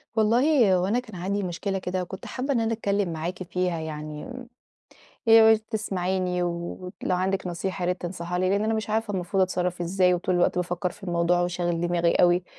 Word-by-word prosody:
والله 230 0 +4
هو 180 - +1
أنا 230 +5 +2
كان 220 -5 -10
عندي 195 +3 -2
مشكلة 195 +2 -2
كده، 185 0 -2
وكنت 190 +2 -7
حابة 270 +2 -2
إن 235 - +1
أنا 225 0 0
اتكلّم 200 -5 -1
معاكِ 175 +4 -4
فيها 180 -1 -1
يعني، 155 +6 -6 0.9
ياريت 220 -1 +7
تسمعيني، 185 -4 -1
ولو 175 +1 -4 0.2
عندِك 190 +1 -1
نصيحة 180 +2 -3
يا - - 0
ريت 180 0 -1
تنصحيها 175 0 -4
لي، 185 +1 +1
لإن 200 +2 +1
أنا 225 +1 +1
مش 220 -1 -3
عارفة 220 -1 -1
المفروض 190 +1 0
أتصرّف 180 -1 -1
إزاي، 180 +1 +2
وطول 180 +1 -1
الوقت 175 0 +2
بافكّر 180 +1 -1
في 200 - -16
الموضوع، 175 0 +2
وشاغل 175 -1 -1
دماغي 175 -1 +2
أوي، 175 0 +4
180 Hz, 185 wpm, -26 LUFS, 175-205 Hz, 0.9 s, ياريت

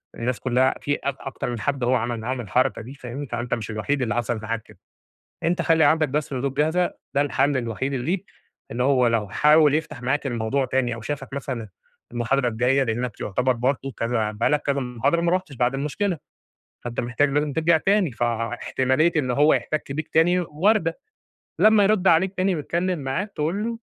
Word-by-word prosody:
الناس 120 -2 -2
كلّها 130 +2 +2
في 145 - 0
اكت 140 -1 -2
أكتر 135 -1 -5
من 120 - -4
حد 135 +3 -2
هو 125 +2 +3
عمل 120 -2 -1
معاهم 125 +3 -3
الحركة 125 +5 0
دي 120 +4 -9
فاهمني، 135 +1 -7
فأنت 120 0 -3
مش 115 -1 -3
الوحيد 130 +6 -1
اللي 115 -4 -1
حصل 120 -1 -1
معاك 110 0 -3
كده، - - -19 0.7
أنت 170 +1 +1
خلّي 165 -1 +4
عندك 155 -1 +3
بس 145 +2 -2
ردود 135 +1 -2
جاهزة 160 +5 +1 0.2
ده 140 - +3
الحل 145 0 +1
الوحيد 125 +2 -2
اللي 125 -1 -3
ليك، 190 +3 -1 0.5
إن 120 - -4
هو 130 -1 +3
لو 115 -3 0
حاول 150 +2 +5
يفتح 155 -4 -3
معاك 140 +4 0
الموضوع 120 +2 0
تاني 130 -2 0
أو 120 - -8
شافك 135 +2 -5
مثلًا 125 -5 -4 0.4
المحاضرة 120 +2 +1
الجايّة 125 +4 +2
لأنك 120 -1 -3
يعتبر 125 +6 +1
برضه 130 +3 -1
كذا 115 -2 -1
بقى 105 +2 0
لك 150 0 +1
كذا 140 -1 0
محاضرة 125 +6 0
ما 170 0 +1
رُحتش 185 -5 -1
بعد 125 +2 +1
المشكلة، 155 +7 -1 0.7
فأنت 120 -1 -3
محتاج 120 +4 +1
لازم 145 +1 0
ترجع 160 +2 +3
تاني، 195 -3 +2
فاحتمالية 120 +6 0
إن 135 -5 +1
هو 145 +5 +4
يحتك 155 -2 -2
بيك 155 +2 -4
تاني 175 +3 +3
واردة، 170 +2 +1 0.6
لمّا 215 -1 +6
يرد 195 -2 +3
عليك 180 +3 +4
تاني، 185 0 +2
ويتكلّم 170 +3 -1
معاك 145 +10 -3
تقول 165 +8 -1
له 230 0 -4
135 Hz, 190 wpm, -23 LUFS, 120-160 Hz, 0.7 s, لمّا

